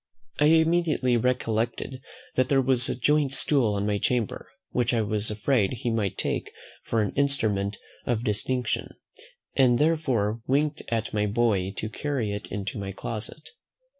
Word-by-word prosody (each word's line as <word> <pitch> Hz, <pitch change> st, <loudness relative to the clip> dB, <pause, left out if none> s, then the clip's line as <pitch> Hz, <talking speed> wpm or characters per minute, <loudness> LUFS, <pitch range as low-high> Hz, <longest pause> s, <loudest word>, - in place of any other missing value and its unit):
I 150 Hz, -, +5 dB
immediately 160 Hz, -5 st, +3 dB
recollected 120 Hz, +1 st, -1 dB, 0.3 s
that 130 Hz, 0 st, +1 dB
there 135 Hz, -, +4 dB
was 130 Hz, -2 st, +2 dB
a -, -, -1 dB
joint 140 Hz, +2 st, +2 dB
stool 120 Hz, -9 st, +2 dB
in 100 Hz, -, -1 dB
my 105 Hz, -1 st, 0 dB
chamber, 120 Hz, -3 st, -1 dB, 0.2 s
which 125 Hz, 0 st, +1 dB
I 115 Hz, -, +2 dB
was 105 Hz, +1 st, -1 dB
afraid 105 Hz, 0 st, +1 dB
he 120 Hz, 0 st, -2 dB
might 105 Hz, -4 st, -1 dB
take -, -, -2 dB, 0.3 s
for 115 Hz, -2 st, +1 dB
an 105 Hz, -, -3 dB
instrument 110 Hz, -8 st, 0 dB, 0.3 s
of 120 Hz, -2 st, 0 dB
distinction, 120 Hz, +2 st, -1 dB, 0.6 s
and 125 Hz, -3 st, +5 dB
therefore 130 Hz, -9 st, +1 dB
winked 145 Hz, +3 st, +1 dB
at 115 Hz, -1 st, -2 dB
my 105 Hz, 0 st, +1 dB
boy 100 Hz, -4 st, +1 dB
to 105 Hz, -, -4 dB
carry 120 Hz, -3 st, -2 dB
it 105 Hz, +1 st, -5 dB
into 100 Hz, +1 st, -4 dB
my 100 Hz, -1 st, -4 dB
closet. 110 Hz, +9 st, -6 dB
120 Hz, 155 wpm, -26 LUFS, 105-135 Hz, 0.6 s, I